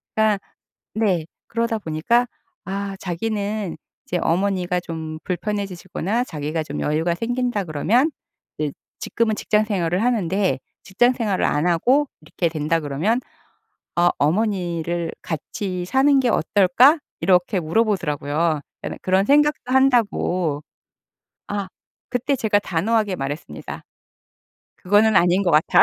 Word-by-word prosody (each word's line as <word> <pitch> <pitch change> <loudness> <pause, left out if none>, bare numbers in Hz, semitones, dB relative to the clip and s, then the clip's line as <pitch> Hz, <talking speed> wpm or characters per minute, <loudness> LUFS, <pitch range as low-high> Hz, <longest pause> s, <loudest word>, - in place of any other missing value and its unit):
그러니까 215 -2 +3 0.5
네. 195 -7 +1 0.2
그러다 230 0 -1
보니까 210 +9 +1 0.4
아 195 0 -3
자기는 205 +1 -3 0.3
이제 180 - -1
어머니가 180 0 +1
좀 160 -2 -6
불편해지시거나 200 +2 -2
자기가 155 - -3
좀 145 -1 -6
여유가 160 +3 0
생긴다 240 +1 -1
그러면 215 - +2 0.5
이제 150 -1 -1 0.3
지금은 225 -2 0
직장생활을 205 -4 0
하는데 195 - +1 0.2
직장생활을 225 -1 +1
안 150 +3 +1
하고 255 - +3
이렇게 160 +2 -2
된다 155 +1 0
그러면 160 - 0 0.8
"아 175 0 +4
어머니를 170 -1 0
같이 180 +3 -4
사는 270 +5 +4
게 250 - +1
어떨까?" 225 - +4 0.2
이렇게 180 +2 +3
물어보더라고요. 160 -5 0 0.2
그러니까는 - - -5
그런 190 +1 +2
생각도 295 -2 +3
한다고. 200 - +2 0.9
아 200 -2 -3 0.4
그때 260 +3 0
제가 220 -4 +2
단호하게 205 +2 0
말했습니다. 145 +2 -6 1.0
"그거는 205 +2 +4
아닌 180 +2 +4
것 180 - +1
같아." 155 0 +5
190 Hz, 300 characters per minute, -22 LUFS, 165-225 Hz, 1.0 s, 같아